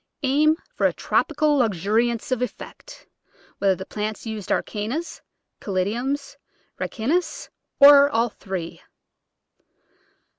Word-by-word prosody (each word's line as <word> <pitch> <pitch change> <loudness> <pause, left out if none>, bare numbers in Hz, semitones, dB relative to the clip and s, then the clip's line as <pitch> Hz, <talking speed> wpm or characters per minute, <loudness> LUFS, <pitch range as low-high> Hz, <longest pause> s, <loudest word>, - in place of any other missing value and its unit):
Aim 300 +4 +3 0.2
for - - +2
a - - -2
tropical 300 -2 +1
luxu 205 -4 0
riance 235 +1 +1
of 255 -2 0
effect 375 - -7 0.3
— - - -30
whether 195 -1 +3
the 190 - -8
plants 215 +2 -5
used 220 -4 -5
are - - +2
Cannas, 230 +11 -5 0.4
Caladiums, 240 +10 -2 0.4
Ricinus, 295 +11 -2 0.3
or 280 0 +9
all 235 -3 +1
three. 185 -5 -7
235 Hz, 115 wpm, -23 LUFS, 210-285 Hz, 0.4 s, or